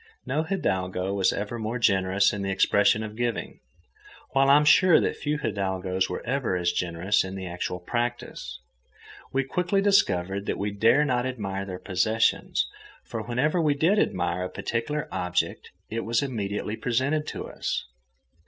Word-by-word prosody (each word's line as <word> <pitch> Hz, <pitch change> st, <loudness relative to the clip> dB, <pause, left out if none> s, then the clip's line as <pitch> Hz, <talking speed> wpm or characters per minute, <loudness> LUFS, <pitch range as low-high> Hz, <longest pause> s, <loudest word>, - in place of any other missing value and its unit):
No 150 Hz, -, 0 dB
hidalgo 95 Hz, -, -1 dB
was 95 Hz, -2 st, +2 dB
ever 105 Hz, +3 st, -4 dB
more 110 Hz, +2 st, -2 dB
generous 95 Hz, -3 st, +3 dB
in 105 Hz, -, -3 dB
the 95 Hz, -, -2 dB
expression 100 Hz, +2 st, +3 dB
of 105 Hz, -1 st, -7 dB
giving, 120 Hz, -1 st, -3 dB, 0.7 s
while 135 Hz, 0 st, +3 dB
I 140 Hz, -, +8 dB
am 150 Hz, -, +3 dB
sure 175 Hz, +3 st, +6 dB
that -, -, 0 dB
few 150 Hz, 0 st, -2 dB
hidalgos 95 Hz, -6 st, -1 dB
were -, -, -5 dB
ever 125 Hz, -5 st, 0 dB
as 85 Hz, -1 st, +1 dB
generous 90 Hz, +3 st, 0 dB
in 95 Hz, 0 st, -6 dB
the 95 Hz, -1 st, -5 dB
actual 90 Hz, 0 st, -4 dB
practice. 120 Hz, -, -4 dB, 0.7 s
We 135 Hz, 0 st, +1 dB
quickly 180 Hz, +8 st, 0 dB
discovered 100 Hz, -, +2 dB
that -, -, -1 dB
we 100 Hz, +1 st, -2 dB
dare 115 Hz, +8 st, +4 dB
not 125 Hz, -2 st, 0 dB
admire 100 Hz, -6 st, -4 dB
their 95 Hz, -2 st, -6 dB
possessions, 110 Hz, +5 st, +1 dB, 0.4 s
for 115 Hz, -, -5 dB
whenever 130 Hz, -, 0 dB
we 150 Hz, -3 st, +2 dB
did 175 Hz, +8 st, +3 dB
admire 90 Hz, -, 0 dB
a -, -, -4 dB
particular 120 Hz, +9 st, -3 dB
object 90 Hz, 0 st, -2 dB, 0.2 s
it 115 Hz, -, -1 dB
was 115 Hz, +3 st, +1 dB
immediately 105 Hz, -4 st, -3 dB
presented 130 Hz, +7 st, 0 dB
to -, -, -5 dB
us. -, -, -3 dB
110 Hz, 160 wpm, -26 LUFS, 95-135 Hz, 0.7 s, I